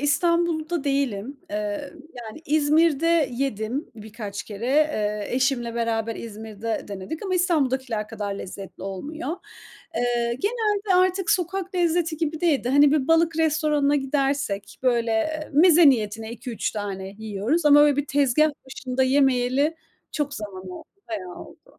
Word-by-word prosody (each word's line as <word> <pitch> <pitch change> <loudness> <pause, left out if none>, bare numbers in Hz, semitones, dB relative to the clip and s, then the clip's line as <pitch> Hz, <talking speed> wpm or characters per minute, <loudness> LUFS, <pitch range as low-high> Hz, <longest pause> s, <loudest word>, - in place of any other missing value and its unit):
İstanbul'da 330 +1 +1
değilim. 275 -2 -1
Eee, 210 +7 -3 0.3
yani 225 +7 -9
İzmir'de 310 +1 +3
yedim 245 +2 -3
birkaç 210 -2 -7
kere. 215 +3 -6
Eee, 215 -8 +1
eşimle 255 -3 0
beraber 230 -1 -1
İzmir'de 220 0 -5
denedik 200 - -6
ama 370 -1 -1
İstanbul'dakiler 260 - 0
kadar 205 -3 -4
lezzetli 195 0 -8
olmuyor. 295 - -5 0.6
Eee, 240 -1 0
genelde 420 -3 0
artık 370 -1 +2
sokak 370 +1 -1
lezzeti 340 -2 +1
gibi 315 -1 -2
değil 320 -8 +2
de, 245 - -1
hani, 285 +2 +5
bir 290 -2 +1
balık 330 0 +3
restoranına 300 -2 +2
gidersek, 270 -7 -1
böyle 240 +5 +1
meze 330 0 +7
niyetine 220 -1 -2
2-3 235 0 -4
tane 195 -2 -5
yiyoruz 220 - -1
ama 290 0 +8
böyle 295 -2 +5
bir 290 0 -1
tezgâh 285 +2 +3 0.2
başında 260 0 -2
yemeyeli 265 +3 +2 0.4
çok 290 -2 -2
zaman 200 -3 -7
oldu, - - -10 0.2
bayağı 185 -5 -5
oldu. - - -14
275 Hz, 130 wpm, -24 LUFS, 220-315 Hz, 0.6 s, ama